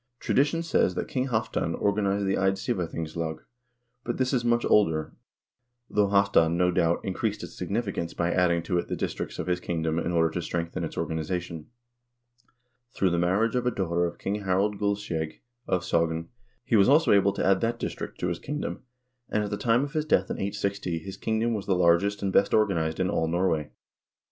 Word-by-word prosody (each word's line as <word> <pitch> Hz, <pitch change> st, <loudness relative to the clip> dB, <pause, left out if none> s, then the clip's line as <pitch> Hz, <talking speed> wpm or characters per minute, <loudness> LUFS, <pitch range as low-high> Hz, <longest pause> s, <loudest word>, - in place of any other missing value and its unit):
Tradition 150 Hz, +5 st, +1 dB
says 95 Hz, -, +2 dB
that -, -, -2 dB
King 130 Hz, 0 st, -1 dB
Halvdan 110 Hz, -8 st, -1 dB
or 100 Hz, -, +2 dB
ganized 100 Hz, -1 st, 0 dB
the 95 Hz, -, +1 dB
Eidsivathingslag, 85 Hz, -4 st, -1 dB, 0.7 s
but -, -, -3 dB
this 130 Hz, +1 st, 0 dB
is 125 Hz, -2 st, +1 dB
much 120 Hz, 0 st, +2 dB
older, 80 Hz, -7 st, +2 dB, 0.8 s
though 105 Hz, -1 st, +3 dB
Halvdan, 100 Hz, -4 st, +3 dB
no 90 Hz, 0 st, +3 dB
doubt, 85 Hz, -1 st, +1 dB
increased 105 Hz, +3 st, -2 dB
its -, -, -9 dB
significance 100 Hz, -3 st, -3 dB
by 85 Hz, 0 st, 0 dB
adding 85 Hz, -2 st, +2 dB
to 90 Hz, 0 st, 0 dB
it -, -, -4 dB
the -, -, -2 dB
districts -, -, -4 dB
of -, -, -3 dB
his 90 Hz, -1 st, 0 dB
kingdom 80 Hz, -2 st, -1 dB
in 85 Hz, -, -2 dB
order 80 Hz, -2 st, +2 dB
to 90 Hz, -, -3 dB
strengthen 85 Hz, 0 st, -3 dB
its -, -, -5 dB
organization. 80 Hz, 0 st, -3 dB, 1.3 s
Through 95 Hz, -2 st, +2 dB
the 85 Hz, -, +1 dB
marriage 100 Hz, +6 st, +2 dB
of 125 Hz, -1 st, 0 dB
a -, -, +5 dB
daughter 85 Hz, -5 st, 0 dB
of 85 Hz, -, -8 dB
King 105 Hz, +2 st, -3 dB
Harald 100 Hz, +2 st, 0 dB
Guldskjeg 100 Hz, -6 st, -2 dB, 0.3 s
of 90 Hz, -2 st, 0 dB
Sogn, 85 Hz, -1 st, 0 dB, 0.4 s
he 120 Hz, -, +2 dB
was 100 Hz, +2 st, +5 dB
also 155 Hz, +4 st, +5 dB
able 100 Hz, -1 st, +4 dB
to -, -, -2 dB
add 95 Hz, 0 st, +3 dB
that 115 Hz, +1 st, 0 dB
district -, -, -5 dB
to 90 Hz, -, 0 dB
his 85 Hz, -1 st, -2 dB
kingdom, 150 Hz, +2 st, -4 dB, 0.5 s
and 105 Hz, -, 0 dB
at 105 Hz, -, -4 dB
the -, -, 0 dB
time 115 Hz, +4 st, +2 dB
of 145 Hz, +1 st, -5 dB
his 155 Hz, -1 st, 0 dB
death 95 Hz, -10 st, +2 dB
in -, -, -3 dB
860 100 Hz, -3 st, -2 dB
his 95 Hz, +4 st, -7 dB
kingdom 110 Hz, +1 st, 0 dB
was 105 Hz, -3 st, -4 dB
the 95 Hz, -, +2 dB
largest 90 Hz, +4 st, +3 dB
and 95 Hz, -1 st, -1 dB
best 100 Hz, -, +4 dB
organized 85 Hz, -7 st, +1 dB
in 95 Hz, -, +2 dB
all 80 Hz, -, 0 dB
Norway. 80 Hz, -3 st, 0 dB
95 Hz, 195 wpm, -27 LUFS, 85-105 Hz, 1.3 s, a